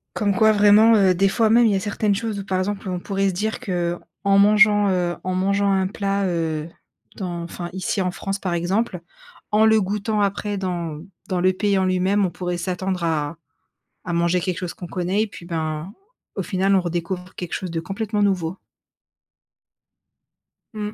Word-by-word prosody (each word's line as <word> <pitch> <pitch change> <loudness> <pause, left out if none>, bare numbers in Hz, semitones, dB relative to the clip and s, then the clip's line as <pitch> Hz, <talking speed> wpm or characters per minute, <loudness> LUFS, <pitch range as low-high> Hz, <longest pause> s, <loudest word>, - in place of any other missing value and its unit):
Comme 205 -1 +1
quoi 220 +3 +4
vraiment, 210 +2 +6
heu, 195 -3 +4
des 195 +3 +2
fois, 220 +2 +2
même, 235 +2 +5
il 215 - +3
y - - +2
a - - +1
certaines 205 0 0
choses, 215 -1 -3
où 195 - -6
par 190 -1 -1
exemple, 200 +1 -3
on 180 -1 -2
pourrait 195 0 0
se 190 - 0
dire 215 +5 -2
qu'en 175 -2 -2 0.4
mangeant, 210 0 +5
heu, 175 -2 0
en 185 0 -1
mangeant 200 +2 +1
un 190 -1 +1
plat, 200 0 -1
heu, 165 -3 -2 0.5
dans 175 -3 -4
enfin 175 +1 -6
ici 190 +1 -2
en 180 -1 0
France, 195 +1 -4
par 180 -3 -2
exemple, 180 +2 -1 0.5
en 215 +1 +4
le 220 -1 +5
goûtant 210 +2 -1
après 205 +1 -1
dans 170 -5 -3 0.3
dans 185 -4 -1
le 185 +1 +4
pays 200 +1 0
en 190 - +2
lui-même, 185 +2 +2
on - - 0
pourrait 180 +1 -3
s'attendre 185 +1 -3
à 160 -1 -1 0.7
à 180 - -4
manger 170 +1 +1
quelque 180 -1 -2
chose 180 -2 -4
qu'on 175 - -9
connaît. 185 +3 -1
Et 220 - 0
puis, 175 - -12
ben, 160 +1 -4 0.4
au - - -2
final, 195 +1 +1
on 190 - +3
redécouvre 175 +1 -4
quelque 180 -2 -6
chose 185 -2 -4
de 165 - -2
complètement 205 +4 -3
nouveau. 185 -3 0 2.2
Mmh. 210 -1 -4
190 Hz, 190 wpm, -22 LUFS, 175-205 Hz, 2.2 s, vraiment